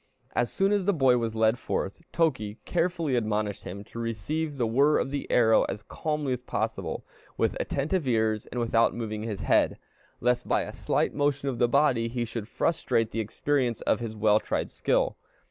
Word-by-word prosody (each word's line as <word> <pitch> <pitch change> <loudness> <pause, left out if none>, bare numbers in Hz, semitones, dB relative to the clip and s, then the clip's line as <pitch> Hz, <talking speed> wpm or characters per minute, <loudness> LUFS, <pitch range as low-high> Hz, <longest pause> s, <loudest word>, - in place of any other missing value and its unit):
As 120 -1 +1
soon 195 +1 +2
as 205 -3 +1
the 200 -1 +2
boy 130 -4 +4
was 115 -1 -2
led 110 +2 +3
forth, 100 - -3
Toki 130 -11 0
carefully 170 -5 0
admonished 105 -3 -1
him 100 +3 -6
to 115 - -9
receive 145 +7 -2
the 120 - +1
whir 140 +7 +4
of 135 - -1
the 145 - -4
arrow 115 -2 +5
as 105 - -5
calmly 150 +1 -2
as 125 - -4
possible, - - -3 0.3
with - - +1
attentive 150 +2 -1
ears, 110 -3 +1
and 125 - -4
without 115 -1 +2
moving 110 -2 -4
his 110 -3 -4
head, - - +2 0.4
lest 125 0 +1
by - - +2
a - - -7
slight - - 0
motion 145 -1 0
of 125 -3 -4
the 120 - +4
body 130 -4 +3
he 120 0 -2
should 115 -2 -5
frustrate 115 -7 0
the 115 - -3
experience 120 +2 0
of - - +1
his 115 -2 -5
well 105 0 +4
tried - - -2
skill. - - +1
120 Hz, 190 wpm, -27 LUFS, 110-145 Hz, 0.4 s, arrow